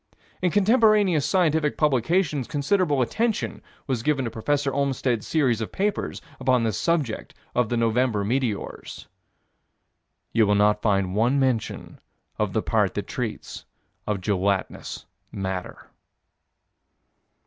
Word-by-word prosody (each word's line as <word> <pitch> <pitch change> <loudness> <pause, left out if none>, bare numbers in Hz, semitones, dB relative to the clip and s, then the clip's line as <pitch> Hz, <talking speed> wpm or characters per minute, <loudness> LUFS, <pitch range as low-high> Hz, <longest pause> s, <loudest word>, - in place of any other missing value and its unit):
In 180 - +2
contemporaneous 205 - +4
scientific 160 -5 +2
publications 150 - +1
considerable 145 -1 +1
attention 225 - -1 0.2
was 130 -4 -1
given 135 0 0
to 115 - -3
Prof. 145 +6 -1
Olmstead's 135 -4 0
series 130 -8 +1
of 110 - -4
papers 205 +1 -2 0.2
upon 130 -2 +2
this 110 -3 -1
subject 155 -10 -1 0.2
of 125 -3 +1
the 120 - 0
November 115 -2 +1
meteors. 120 -2 -3 1.3
You 110 -2 +4
will 105 - +3
not 105 +1 +3
find 100 -3 +1
one 120 +7 +2
mention 130 -4 -2 0.4
of - - 0
the - - 0
part - - +1
that - - -2
treats - - -5 0.4
of 105 -3 -1
gelatinous 100 -3 -2 0.3
matter. 95 -3 -5
130 Hz, 120 wpm, -24 LUFS, 110-155 Hz, 1.3 s, contemporaneous